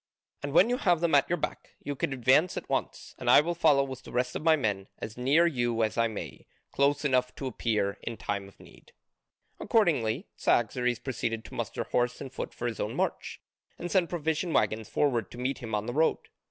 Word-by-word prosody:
And 145 - -4
when 185 - +6
you 245 +1 0
have 175 -8 +2
them 170 -1 0
at 140 -1 +4
your 175 - +1
back, - - -5
you 145 - -3
could 135 - -2
advance 135 +7 +3
at - - -5
once, - - -3
and - - -1
I - - +9
will 170 +4 0
follow 150 -5 +4
with 130 -1 -7
the - - -12
rest 125 +1 -1
of - - -3
my 160 0 +5
men 105 -8 -2
as 110 - -7
near 140 +7 +3
you 120 -7 +1
as 110 - -1
I 115 0 +2
may, 110 -2 -8 0.2
close 140 +1 +1
enough 125 -2 +1
to 135 - -6
appear 110 -5 -1
in 115 - -5
time 100 -1 -3
of 100 - -19
need." - - -18 0.7
Accordingly, 155 - +1
Cyaxares 125 +1 +1
proceeded 115 -3 -3
to - - -12
muster - - -3
horse 125 0 0
and 135 -1 -8
foot - - -5
for 120 - -6
his 120 -2 -3
own 105 - -2
march, - - -2 0.4
and 175 - -5
sent 185 -3 +2
provision 160 0 -1
waggons 110 -1 +1
forward 130 -6 +1
to - - -11
meet 130 +2 -2
him 115 -4 -4
on 105 0 -2
the 120 - -4
road. 160 +4 +3
130 Hz, 220 wpm, -29 LUFS, 115-155 Hz, 0.7 s, I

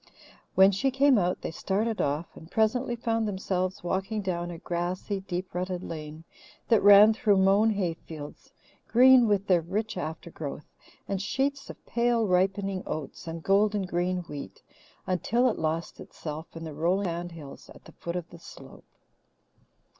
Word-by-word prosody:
When 190 +1 +7
she 200 +8 +1
came 270 -2 +4
out 180 -1 -1
they - - -4
started 210 +6 -1
off, 145 +4 -2
and 160 - -13
presently 240 +4 +1
found 230 -2 -1
themselves 185 -2 -2
walking 195 +4 -2
down 175 -2 -2
a 170 - -7
grassy, 180 +4 -3
deep 185 -1 -5
rutted 180 0 -3
lane 155 0 -7 0.5
that 225 -3 +5
ran 205 +2 +8
through 215 -3 +2
mown 195 +3 +4
hay 195 -6 0
fields, 155 -2 -11 0.4
green 250 0 +6
with 200 -2 +1
their 180 -4 +3
rich 195 +5 -3
aftergrowth, 160 -3 -6 0.4
and 195 -1 -2
sheets 275 +7 -2
of - - -11
pale 235 -1 +1
ripening 190 +1 +1
oats 155 +1 -6
and 165 0 -6
golden 205 +1 +2
green 180 0 -1
wheat, 145 - -9 0.4
until 230 +7 +1
it - - -6
lost 160 +1 -2
itself 155 +1 -7
in 165 - -7
the 160 -2 -6
rolling 175 +6 0
sand 175 0 -4
hills 145 -4 -11
at - - -17
the - - -13
foot 170 0 -6
of 175 -2 -4
the 170 - -12
slope. - - -13
185 Hz, 160 wpm, -27 LUFS, 170-210 Hz, 0.5 s, ran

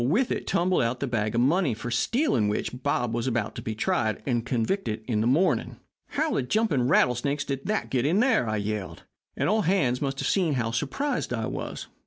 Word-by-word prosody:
With 205 - +2
it - - -2
tumbled 180 +1 +2
out 120 +2 -1
the 140 - -1
bag 110 -4 -1
of 120 - +3
money 145 - +2
for 120 +2 -6
stealing 130 - +1
which 125 +4 -3
Bob 120 -5 0
was 120 +1 -1
to 115 0 -2
be 110 -2 -4
tried 110 0 0
and 120 -4 0
convicted 115 - -1
in 110 -4 +1
the 115 - +1
morning. 155 +10 +2 0.3
"'How 310 +2 -1
the - - +1
jumping 145 - +1
rattlesnakes 140 +2 +2
did 135 -1 -4
that 215 0 -1
get 130 - +2 0.2
there?' 230 - +3
I 110 - 0
yelled, 105 -2 -4 0.3
and - - +1
all 215 +2 +3
hands 150 -11 +1
must 135 -1 -2
have - - -2
seen 175 -7 +2
how 115 -3 -1
surprised 245 - -2
I 115 -2 -1
was. - - -5
125 Hz, 205 wpm, -26 LUFS, 115-175 Hz, 0.3 s, of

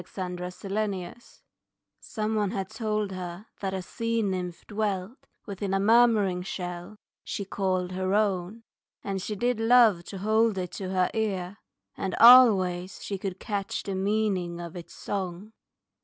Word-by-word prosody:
Her 185 -2 -3
Lesson 185 +1 -4 0.9
Someone 215 -2 -1
had 195 -2 -4
told 215 -2 -2
her 180 +1 -6
that 195 -1 -2
a 190 - -4
sea 230 +3 -2
nymph 180 -3 -3
dwelt 205 +1 -3 0.2
Within 195 -1 -3
a - - +2
murmuring 210 -4 +4
shell, 180 +1 -6 0.3
she 200 - -4
called 185 -2 -1
her 185 +1 -1
own, 205 +1 0 0.4
And 195 -1 -3
she 210 +3 -4
did 240 +2 0
love 225 -6 +5
to 195 - -7
hold 220 +2 +2
it 180 -2 -3
to 185 0 -5
her 185 -1 +1
ear, 200 -3 -2 0.4
And 190 - -3
always 195 -7 +6
she 200 -2 -4
could 190 -1 -5
catch 200 -3 -3
the 195 - -4
meaning 190 -3 0
of 170 0 -7
Its 175 -2 -9
song. 195 +2 -5
195 Hz, 145 wpm, -27 LUFS, 185-215 Hz, 0.9 s, always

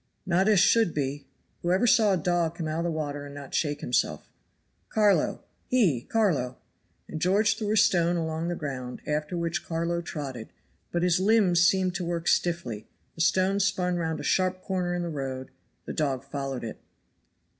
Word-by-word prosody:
"Not 185 +2 +2
as 210 -3 +5
should 200 0 +4
be. 140 -1 -3 0.3
Who 175 - 0
ever 190 +6 +3
saw 215 -3 +5
a - - +2
dog 170 -1 0
come 165 -2 -4
out 155 +1 -2
of 170 - -1
the - - 0
water 145 -3 -3
and 140 0 -9
not 140 -1 -9
shake 145 -2 0
himself? 120 - -1 0.6
Carlo, 210 -2 +2 0.3
hie, 180 - +2
Carlo!" 155 - +1 0.5
and 155 - -6
George 205 +3 +3
threw 210 -1 -2
a - - +2
stone 175 -3 +4
along 160 0 -2
the 175 - -1
ground, 130 -5 -6
after 150 +3 -2
which 170 0 -2
Carlo 170 +1 -2
trotted; 135 -8 -6 0.4
but 175 0 0
his 180 -1 +3
limbs 195 -4 +4
seemed 185 0 +3
to 185 - -3
work 170 -1 -3
stiffly; 125 -12 0 0.3
the 165 - -5
stone 185 +4 +2
spun 185 -3 +1
round 160 -2 -2
a - - -6
sharp 185 0 +1
corner 180 -2 -1
in 175 - -2
the - - -3
road, 135 -3 -5 0.3
the - - -5
dog 135 -4 -1
followed 135 -2 -4
it. 110 - -6
170 Hz, 185 wpm, -27 LUFS, 145-185 Hz, 0.6 s, as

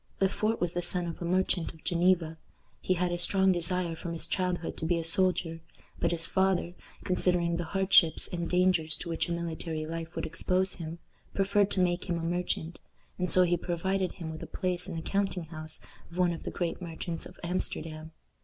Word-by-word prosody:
Le 195 - +4
Fort 215 +3 0
was 175 -1 0
the 175 - -1
son 175 0 +1
of 170 0 -6
a - - -2
merchant 180 -1 +1
of 160 - -19
Geneva. 170 -2 +2 0.4
He 185 - +1
had 180 0 0
a 175 - -1
strong 190 +2 +4
desire 175 -1 0
from 170 +1 -5
his 165 - -3
childhood 180 -3 -1
to 160 - -3
be 175 0 +2
a 165 - -2
soldier, 165 -1 +1 0.4
but 170 - +2
his 165 -1 +6
father, 190 -2 +1 0.3
considering 180 -2 +2
the 175 - -2
hardships 190 -2 +4
and 170 -1 -3
dangers 180 -3 +3
to 175 - -5
which 165 +1 -1
a - - -2
military 165 -2 -3
life 165 0 -5
would - - -2
expose 185 +3 0
him, 165 -1 -6 0.4
preferred 200 +1 +3
to 185 - +2
make 175 0 +1
him 175 -3 -1
a 165 - -4
merchant, 170 -1 -2 0.4
and 180 0 0
so 185 - +6
he 175 0 +3
provided 185 +2 -1
him 165 -3 -6
with 160 - -7
a - - -6
place 180 -2 -1
in 180 - -5
the 160 - -4
counting 195 -2 0
house 155 -1 -7 0.3
of 170 - -11
one 180 -1 +3
of 165 - -8
the - - -2
great 175 +1 -3
merchants 165 -1 -5
of - - -16
Amsterdam. 160 -3 -3
175 Hz, 210 wpm, -30 LUFS, 165-185 Hz, 0.4 s, his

